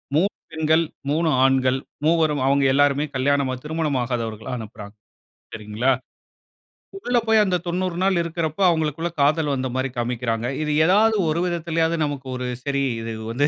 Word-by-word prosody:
3 190 Hz, +6 st, +3 dB, 0.2 s
பெண்கள், 160 Hz, +1 st, +2 dB, 0.3 s
3 160 Hz, +3 st, +1 dB, 0.2 s
ஆண்கள், 130 Hz, 0 st, +2 dB, 0.3 s
மூவரும் 155 Hz, -3 st, +2 dB
அவங்க 140 Hz, +1 st, +3 dB
எல்லாருமே 145 Hz, +1 st, +3 dB
கல்யாணம் 140 Hz, 0 st, +1 dB
திருமணமாகாதவர்களை 125 Hz, -8 st, -2 dB
அனுப்புறாங்க. 105 Hz, -2 st, -9 dB, 0.6 s
சரிங்களா? 105 Hz, +5 st, -1 dB, 1.1 s
உள்ள 245 Hz, -10 st, 0 dB
போய் 220 Hz, -1 st, +5 dB
அந்த 185 Hz, -2 st, +1 dB
90 180 Hz, 0 st, -2 dB
நாள் 190 Hz, -2 st, +2 dB
இருக்கிறப்போ, 165 Hz, +1 st, -3 dB
அவங்களுக்குள்ள 160 Hz, +1 st, -1 dB
காதல் 150 Hz, +1 st, +2 dB
வந்த 130 Hz, -1 st, -2 dB
மாரி 130 Hz, +1 st, -1 dB
காண்பிக்கிறாங்க. 120 Hz, -1 st, -2 dB
இது 150 Hz, -1 st, -1 dB
ஏதாவது 215 Hz, +4 st, +4 dB
ஒரு 165 Hz, +3 st, 0 dB
விதத்திலாவது 165 Hz, -1 st, 0 dB
நமக்கு 140 Hz, -2 st, -4 dB
ஒரு 125 Hz, 0 st, -4 dB, 0.2 s
"சரி, 140 Hz, -1 st, 0 dB, 0.2 s
இது 115 Hz, 0 st, -5 dB, 0.2 s
வந்து 135 Hz, +5 st, +1 dB
145 Hz, 140 wpm, -22 LUFS, 130-165 Hz, 1.1 s, போய்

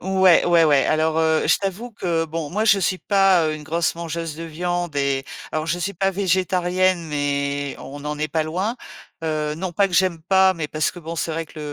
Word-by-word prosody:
Ouais, 190 Hz, -2 st, +4 dB
ouais, 170 Hz, -1 st, +5 dB
ouais. 145 Hz, -3 st, +4 dB
Alors, 155 Hz, +1 st, +1 dB
heu, 160 Hz, -1 st, +2 dB
je -, -, +4 dB
t'avoue 200 Hz, +5 st, -4 dB
que 170 Hz, -4 st, -1 dB
bon, 160 Hz, -1 st, -4 dB
moi, 210 Hz, +7 st, -1 dB
je 205 Hz, -3 st, +5 dB
suis 185 Hz, 0 st, 0 dB
pas, 195 Hz, -3 st, +3 dB
heu, 155 Hz, -, -1 dB
une 155 Hz, -, -8 dB
grosse 165 Hz, +2 st, 0 dB
mangeuse 165 Hz, -1 st, -5 dB
de 165 Hz, +2 st, -7 dB
viande 175 Hz, -1 st, -3 dB
et 140 Hz, -1 st, 0 dB, 0.3 s
alors 155 Hz, 0 st, -2 dB
je 170 Hz, +2 st, -1 dB
suis 195 Hz, +3 st, -2 dB
pas 195 Hz, +2 st, 0 dB
végétarienne, 185 Hz, -1 st, +1 dB
mais, 140 Hz, -1 st, -2 dB
on 145 Hz, +1 st, -9 dB
en 150 Hz, 0 st, -3 dB
est 155 Hz, -, 0 dB
pas 160 Hz, +2 st, 0 dB
loin. 185 Hz, +9 st, -2 dB, 0.5 s
Heu, 155 Hz, -1 st, -1 dB
non 185 Hz, +1 st, -4 dB
pas 200 Hz, +3 st, +3 dB
que -, -, -13 dB
j'aime 175 Hz, -3 st, +2 dB
pas, 190 Hz, +2 st, +4 dB
mais 155 Hz, -3 st, -4 dB
parce 155 Hz, 0 st, 0 dB
que -, -, -12 dB
bon, 165 Hz, +1 st, -6 dB
c'est 165 Hz, -, -2 dB
vrai 165 Hz, +1 st, -3 dB
que 160 Hz, -, -14 dB
165 Hz, 225 wpm, -22 LUFS, 155-185 Hz, 0.5 s, ouais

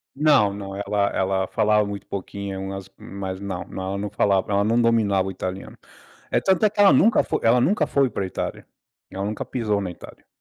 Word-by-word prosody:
não, 135 Hz, -9 st, +4 dB
não, 100 Hz, -1 st, -7 dB
ela 100 Hz, 0 st, 0 dB
ela 95 Hz, 0 st, 0 dB
falava 105 Hz, +1 st, +2 dB
muito 100 Hz, 0 st, -7 dB
pouquinho, 100 Hz, 0 st, -5 dB
umas 95 Hz, 0 st, -6 dB
mas 95 Hz, -1 st, -6 dB
não, 100 Hz, -3 st, -5 dB
não, 95 Hz, -, -7 dB
ela 100 Hz, -, -3 dB
não 105 Hz, +1 st, -3 dB
falava 100 Hz, 0 st, +1 dB
ela 100 Hz, 0 st, +2 dB
não 115 Hz, +3 st, +2 dB
dominava 105 Hz, -5 st, +2 dB
o -, -, -3 dB
italiano. 95 Hz, +1 st, -6 dB, 0.5 s
É -, -, +3 dB
tanto 190 Hz, +2 st, +2 dB
é -, -, +5 dB
que 210 Hz, -, -10 dB
ela 200 Hz, -1 st, +7 dB
nunca 225 Hz, +2 st, +4 dB
foi -, -, -2 dB
ela 120 Hz, +2 st, +4 dB
nunca 175 Hz, -, +2 dB
foi 140 Hz, -2 st, +2 dB
pra 100 Hz, -3 st, -3 dB
Itália, 95 Hz, -, -5 dB, 0.5 s
ela 95 Hz, +1 st, -4 dB
nunca 105 Hz, +1 st, -4 dB
pisou 105 Hz, -5 st, -1 dB
na 95 Hz, -2 st, -4 dB
Itália. 85 Hz, -, -14 dB
100 Hz, 210 wpm, -23 LUFS, 95-115 Hz, 0.5 s, ela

